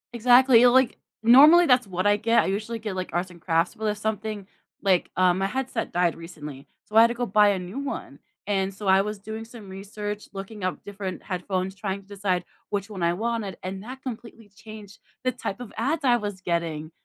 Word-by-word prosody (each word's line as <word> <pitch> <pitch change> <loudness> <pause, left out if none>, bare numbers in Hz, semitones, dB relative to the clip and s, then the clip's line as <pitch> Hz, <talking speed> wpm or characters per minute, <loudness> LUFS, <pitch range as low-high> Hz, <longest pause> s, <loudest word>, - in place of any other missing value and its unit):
Exactly, 245 +1 +6
or 250 - +8
like, 260 0 +3 0.3
normally, 295 +9 +8
that's 250 -6 +3
what 185 0 -3
I 205 0 +4
get. 230 +2 +3
I - - -2
usually 215 +4 -2
get, 215 -3 -5
like, 185 -1 -4
arts 180 +2 -1
and 170 - -15
crafts, 165 0 +1
but 220 - -6
if 210 -1 0
something 215 -1 -3 0.4
like 190 -3 +2
um, 185 0 +3
my 195 - +1
headset 260 0 -3
died 175 -1 +1
recently, 150 -4 -10 0.2
so 210 - -11
I 225 - +9
had 230 - +7
to 235 - -3
go 245 +1 -1
buy 210 0 +4
a 200 - +1
new 180 +8 -6
one 270 - -6 0.3
and 195 -1 -1
so 200 +1 -7
I 190 0 +6
was 210 +1 -4
doing 220 +2 -7
some 225 -4 -12
research, 205 +2 -6
looking 195 0 -6
up 185 - -3
different 195 -2 -6
headphones, 185 0 -3
trying 195 -1 -4
to 195 - -24
decide 195 -3 -1 0.3
which 200 0 -2
one 195 -4 -7
I 170 0 +2
wanted, 220 0 -3
and 190 +1 -5
that 260 +3 -9
completely 230 -3 -8
changed 215 0 -12 0.2
the 255 - +1
type 240 -2 -5
of 240 - -8
ads 285 +8 -1
I 245 -3 +4
was 205 -4 -5
getting. 165 -3 -2
205 Hz, 220 wpm, -25 LUFS, 185-230 Hz, 0.4 s, I